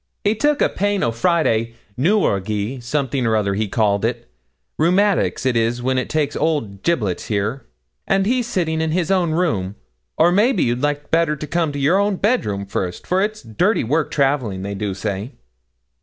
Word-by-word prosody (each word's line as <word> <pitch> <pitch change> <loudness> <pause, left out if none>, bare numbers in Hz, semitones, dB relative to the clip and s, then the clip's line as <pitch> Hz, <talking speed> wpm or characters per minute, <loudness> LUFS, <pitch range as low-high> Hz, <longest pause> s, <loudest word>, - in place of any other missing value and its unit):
'He 205 - +3
took 295 +6 +1
a - - +3
pain 205 0 0
o' 115 - +1
Friday, 115 -4 +1 0.2
newralgie 115 - 0
something 135 +1 -1
or 110 - +2
other 100 -2 +1
he 105 +2 -1
calls 100 -1 +1
it 120 +1 -2 0.5
rheumatics 175 - +2
it 130 -2 +2
is 115 +1 +1
when 130 0 +1
it - - -4
takes 150 -2 0
old 115 -12 -1
"Giblets" 110 - -1
there; 110 +5 -2 0.4
and 195 0 +2
he's 245 +2 +1
sitting 160 -7 -1
in 160 - 0
his 175 0 0
own 180 -3 +2
room; 110 - 0 0.4
or 175 - +5
maybe 205 +1 +3
you'd 120 +1 0
like 145 0 -2
better 165 -2 +2
to 150 - -6
come 165 0 0
to - - -4
your 190 +9 +2
bedroom 180 - 0
first, 90 -2 -4
for 185 +1 +1
it 210 +2 0
is 215 - -15
dirty 180 - +1
work 150 +7 0
travelling, 135 -9 0
they 100 +1 -4
do 100 -1 -3
say.' 100 +3 -4
140 Hz, 185 wpm, -20 LUFS, 110-180 Hz, 0.5 s, or